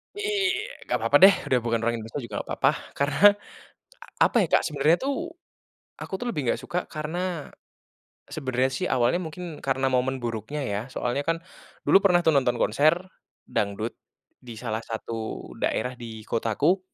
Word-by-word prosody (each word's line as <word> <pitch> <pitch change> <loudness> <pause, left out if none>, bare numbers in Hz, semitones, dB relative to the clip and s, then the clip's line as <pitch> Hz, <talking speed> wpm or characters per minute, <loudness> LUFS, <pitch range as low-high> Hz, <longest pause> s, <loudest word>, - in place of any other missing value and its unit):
Iya. 415 0 -1
Enggak - - +1
apa-apa - - +5
deh, 195 - +11 0.2
udah 125 - +5
bukan 115 -1 0
orang 120 0 +1
Indonesia 115 +6 -6
juga 115 - -5
enggak - - -7
apa-apa. - - +4 0.2
Karena 140 0 0 1.0
apa - - +4
ya, - - 0
Kak, - - +4
sebenarnya 150 +3 +3
tuh, 305 +6 -2 0.7
aku - - -8
tuh 245 - -3
lebih 150 - -3
enggak - - +1
suka 175 - -2
karena 165 +1 -4 0.8
sebenarnya 130 -3 -1
sih 130 - -2
awalnya 125 +6 +2
mungkin 165 0 -7
karena 135 0 +1
momen 130 +1 +1
buruknya 115 +5 -3
ya. 100 0 -1
Soalnya 125 +2 -1
kan 165 +2 0 0.5
dulu 195 - +6
pernah 180 -3 +5
tuh 160 - +5
nonton 125 -3 +2
konser 155 +9 +3 0.5
dangdut 105 +3 -2 0.4
di 120 -2 -10
salah 110 -2 -2
satu 110 - -5
daerah 125 +3 -1
di 110 -2 -8
kotaku 115 - +1
135 Hz, 160 wpm, -26 LUFS, 115-170 Hz, 1.0 s, deh